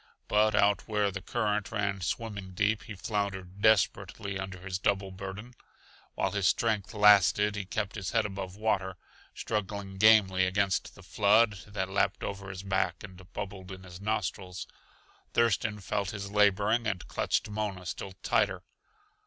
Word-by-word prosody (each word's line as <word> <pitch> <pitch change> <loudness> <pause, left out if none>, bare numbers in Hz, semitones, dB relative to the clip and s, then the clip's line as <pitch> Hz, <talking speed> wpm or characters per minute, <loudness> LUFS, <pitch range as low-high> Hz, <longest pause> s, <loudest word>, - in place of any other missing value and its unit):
But 105 +1 +3
out 100 -1 +3
where 105 -2 +1
the 95 0 -5
current 105 0 -1
ran 100 -3 -1
swimming 100 -1 -4
deep 105 +3 +1
he 110 - -7
floundered 100 -1 -3
desperately 100 -2 +2
under 95 -1 -6
his 95 0 -4
double 100 -1 0
burden. 100 +5 -7 0.6
While - - 0
his 100 -2 +1
strength 110 -2 0
lasted 105 0 +5
he 100 -2 -3
kept 105 +2 -3
his 100 -3 -4
head 115 -1 +1
above 95 -2 -5
water, 95 -3 -1 0.4
struggling 100 -2 -3
gamely 95 -4 +6
against 95 0 0
the 95 - -14
flood 105 +3 +3
that 100 -2 -3
lapped 95 +1 0
over 95 -1 -5
his 95 0 -7
back 95 +2 -1
and 95 -2 -12
bubbled 100 -2 -6
in 95 0 -9
his 90 0 -11
nostrils. 95 -3 -3 0.7
Thurston 110 -2 +2
felt 100 0 -2
his 100 -1 -6
laboring 105 +3 +3
and 95 -5 -3
clutched - - 0
Mona 105 -3 -4
still 95 +2 -5
tighter. 95 -4 +1
100 Hz, 155 wpm, -30 LUFS, 95-105 Hz, 0.7 s, gamely